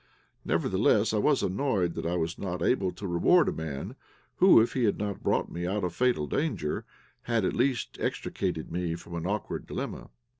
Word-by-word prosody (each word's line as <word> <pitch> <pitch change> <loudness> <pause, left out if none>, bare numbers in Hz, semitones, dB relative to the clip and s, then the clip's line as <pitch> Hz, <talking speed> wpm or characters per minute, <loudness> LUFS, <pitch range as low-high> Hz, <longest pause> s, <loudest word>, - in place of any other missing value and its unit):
Nevertheless, - - +2
I - - +2
was - - +2
annoyed 95 -5 0
that - - -3
I 85 - 0
was 85 -1 -2
not 90 -3 -3
able 100 -5 +2
to 90 +3 -8
reward 95 - +4
a - - +2
man 75 -4 -5 0.4
who, 185 -9 +7
if 115 - +2
he 125 -3 +1
had 105 - +1
not 100 -1 -3
brought - - 0
me 85 +1 -3
out 100 +2 -1
of 90 -2 -1
fatal 125 -9 +1
danger, 75 - -2 0.4
had, 115 -4 +1
at - - 0
least, 125 0 0
extricated 90 -5 -2
me 85 -1 -2
from 85 0 -11
an 85 +1 -3
awkward 105 +1 -3
dilemma. - - -5
90 Hz, 190 wpm, -28 LUFS, 85-115 Hz, 0.4 s, who